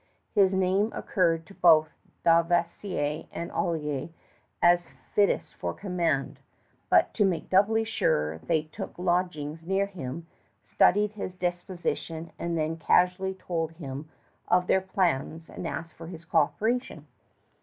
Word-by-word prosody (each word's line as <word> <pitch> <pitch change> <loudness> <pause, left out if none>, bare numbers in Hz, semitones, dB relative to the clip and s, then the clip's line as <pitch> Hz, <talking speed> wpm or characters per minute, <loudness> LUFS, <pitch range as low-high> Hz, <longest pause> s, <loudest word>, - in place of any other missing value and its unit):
His 195 -2 +5
name 190 +3 +2
occurred 165 -4 +1
to 195 - -14
both 160 -5 +5 0.3
Dauversière 170 -2 +1
and 170 - -5
Olier 155 -6 -2 0.5
as 175 0 +4 0.3
fittest 205 -1 +2
for - - -4
command; 175 -7 -1 0.5
but - - +4
to 210 - +2
make 185 -4 -1
doubly 210 +4 +4
sure, 80 - 0
they 160 - 0
took 155 - -8
lodgings 175 -4 -1
near 195 +4 +1
him, 165 -5 -7 0.4
studied 205 +2 +3
his 200 -3 -6
disposition, 175 -2 -3
and 170 -1 -2
then 160 +1 -1
casually 180 +3 +2
told 165 -3 -3
him 145 -2 -7 0.4
of 180 0 +3
their 190 - +3
plans 165 -4 -1
and 170 - -5
asked 165 -1 -6
his 165 0 -9
coöperation. 170 - 0
175 Hz, 125 wpm, -27 LUFS, 160-190 Hz, 0.5 s, His